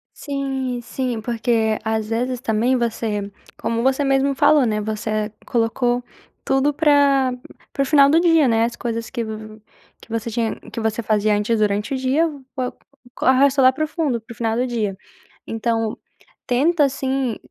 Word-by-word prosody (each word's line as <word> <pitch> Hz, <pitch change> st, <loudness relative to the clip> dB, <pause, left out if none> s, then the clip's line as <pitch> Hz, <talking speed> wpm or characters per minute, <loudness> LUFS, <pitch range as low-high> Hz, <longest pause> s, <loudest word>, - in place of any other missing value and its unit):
Sim, 270 Hz, -3 st, -3 dB
sim, 240 Hz, -1 st, -3 dB
porque 225 Hz, -1 st, 0 dB
às 220 Hz, -1 st, -1 dB
vezes 245 Hz, +2 st, -1 dB
também 235 Hz, +1 st, +1 dB
você 220 Hz, -4 st, -2 dB, 0.3 s
como 230 Hz, +1 st, -2 dB
você 265 Hz, +2 st, +2 dB
mesmo 275 Hz, 0 st, +2 dB
falou, 290 Hz, 0 st, +4 dB
né, 215 Hz, -2 st, 0 dB
você 215 Hz, 0 st, -2 dB
colocou 240 Hz, +1 st, 0 dB, 0.4 s
tudo 270 Hz, +2 st, +2 dB
pra 280 Hz, -3 st, +3 dB, 0.4 s
pro 275 Hz, -, 0 dB
final 280 Hz, 0 st, +5 dB
do 320 Hz, +3 st, +5 dB
dia, 330 Hz, -4 st, +4 dB
né, 225 Hz, -1 st, +3 dB
as 235 Hz, 0 st, -4 dB
coisas 230 Hz, -1 st, -4 dB
que 240 Hz, -3 st, -3 dB
vo 215 Hz, 0 st, -8 dB, 0.4 s
que -, -, -17 dB
você 230 Hz, 0 st, -3 dB
tinha 230 Hz, 0 st, -1 dB, 0.2 s
que -, -, -5 dB
você 220 Hz, 0 st, -1 dB
fazia 210 Hz, 0 st, +2 dB
antes 210 Hz, +2 st, 0 dB
durante 210 Hz, +3 st, 0 dB
o -, -, 0 dB
dia, 265 Hz, +6 st, +2 dB, 0.9 s
co -, -, -4 dB
arrasta 270 Hz, +2 st, +4 dB
lá 260 Hz, 0 st, +7 dB
profundo, 310 Hz, -3 st, -1 dB
para 235 Hz, +2 st, -11 dB
o -, -, -20 dB
final 225 Hz, -1 st, 0 dB
do 250 Hz, +1 st, 0 dB
dia. 215 Hz, -5 st, -2 dB, 0.5 s
Então, 225 Hz, -1 st, -1 dB, 0.5 s
tenta 290 Hz, +5 st, +3 dB
assim, 265 Hz, -3 st, -1 dB
240 Hz, 160 wpm, -21 LUFS, 220-270 Hz, 0.9 s, lá